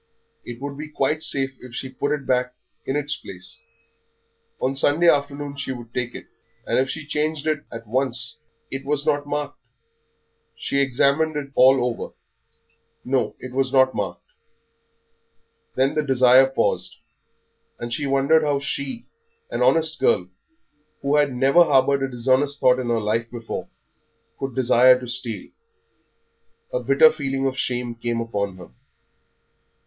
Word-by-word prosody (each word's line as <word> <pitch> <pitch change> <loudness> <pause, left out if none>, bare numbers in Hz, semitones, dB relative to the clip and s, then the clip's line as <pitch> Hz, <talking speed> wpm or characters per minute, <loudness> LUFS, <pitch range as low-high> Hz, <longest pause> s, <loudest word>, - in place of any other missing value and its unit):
It 120 -1 -8
would 140 +1 -6
be 155 0 -6
quite 150 +1 0
safe 135 -4 0
if 125 -2 -11
she 130 - -4
put 135 +2 -3
it 145 -2 -2
back 125 0 0 0.3
in 135 - -1
its 145 0 -1
place; 90 -1 -8 1.0
on 135 +1 -1
Sunday 145 +5 +3
afternoon 145 -1 +1
she 140 -1 -3
would 120 -2 -11
take 125 -1 -3
it, - - -8 0.4
and - - +1
if 135 +1 +1
she 155 +1 -5
changed 150 0 -2
it 155 -2 -1
at 115 0 -8
once 125 +2 -1 0.3
It 135 0 -4
was 145 +1 -1
not 145 0 0
marked. 145 0 -4 1.0
She 140 - -2
examined 140 +4 +2
it 140 -2 -4
all 130 -1 +5
over. 120 -2 -4 0.9
No, 125 -5 0
it 130 - -9
was 130 0 0
not 130 -1 +4
marked. 90 -4 -4 1.5
Then 135 +2 +2
the 155 - +1
desire 130 -2 +5
paused, 135 - 0 0.8
and 120 0 -5
she 145 +3 -1
wondered 140 +4 +3
how 145 -2 +1
she, 140 - -4 0.5
an - - -2
honest 160 -2 +3
girl, 90 0 +2 0.7
who 140 +2 +2
had 145 -2 +3
never 135 +7 +5
harboured 140 -2 +3
a 135 - -1
dishonest 130 +3 +1
thought 125 0 +4
in 125 - -3
her 115 -1 +2
life 110 +2 -1
before, 115 -2 -6 0.7
could 135 -3 -4
desire 125 0 +5
to 125 - -8
steal; 120 -3 -3 1.2
a - - +1
bitter 475 -1 +5
feeling 135 - -3
of 135 -1 0
shame 125 -2 -2
came 115 0 -3
upon 100 -4 -3
her. 90 -9 -12
135 Hz, 155 wpm, -23 LUFS, 125-145 Hz, 1.5 s, all